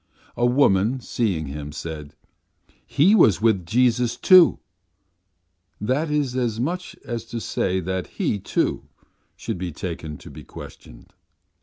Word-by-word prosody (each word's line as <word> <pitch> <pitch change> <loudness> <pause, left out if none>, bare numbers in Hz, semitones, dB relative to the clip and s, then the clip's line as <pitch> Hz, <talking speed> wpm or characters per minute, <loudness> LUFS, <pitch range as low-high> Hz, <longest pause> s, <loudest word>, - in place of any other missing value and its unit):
A 120 - +2
woman, 120 -2 +3
seeing 100 -10 -2
him, 75 +1 -7
said: 75 -1 -7 0.7
'He 165 +9 +4
was 115 - +5
with 105 -6 +1
Jesus, 120 +2 +2
too' 185 -3 +6 1.2
that 130 +9 -1
is 145 -4 -1
as 120 -4 -1
much 175 +8 -3
as 120 -2 -4
to 115 0 -5
say 95 -3 -1
that 95 +1 -3
he, 100 - -2
too, - - -1 0.5
should 110 -6 -5
be 90 -1 -4
taken 80 -2 -6
to - - -13
be - - -11
questioned. - - -13
115 Hz, 135 wpm, -23 LUFS, 90-125 Hz, 1.2 s, too